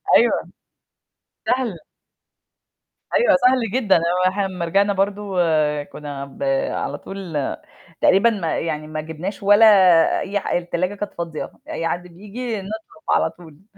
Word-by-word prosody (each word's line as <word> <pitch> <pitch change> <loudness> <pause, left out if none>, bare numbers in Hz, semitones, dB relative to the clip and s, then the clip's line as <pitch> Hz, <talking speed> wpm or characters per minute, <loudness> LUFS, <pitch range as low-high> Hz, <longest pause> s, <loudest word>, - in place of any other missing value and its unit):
أيوه، - - +3 1.0
سهل. 245 -8 0 1.4
أيوه 485 - +4
سهل 250 -4 +2
جدًا، 225 -7 +3
هو 180 +2 +2
إحنا 195 +1 -1
أمّا 185 -3 -4
رجعنا 200 +4 +2
برضه 200 +1 0 0.6
كنا 145 -2 -7
ب 140 - -9 0.3
على - - -3
طول 190 -6 -6 0.6
تقريبًا 195 +5 +5
ما 195 -8 -2
يعني 155 -2 -3
ما 155 0 -4
جبناش 160 +6 -6
ولا 205 +3 +6 0.5
أي 205 +1 -2
حا - - -1
التلاجة 175 +2 -2
كانت 205 0 -5
فاضية، 170 -2 -5 0.2
أي 165 - -2
حد 175 +1 -3
بييجي 210 +5 -6
نطلب 205 -4 -9
على - - +3
طول. 165 0 -16
190 Hz, 135 wpm, -21 LUFS, 165-205 Hz, 1.4 s, ولا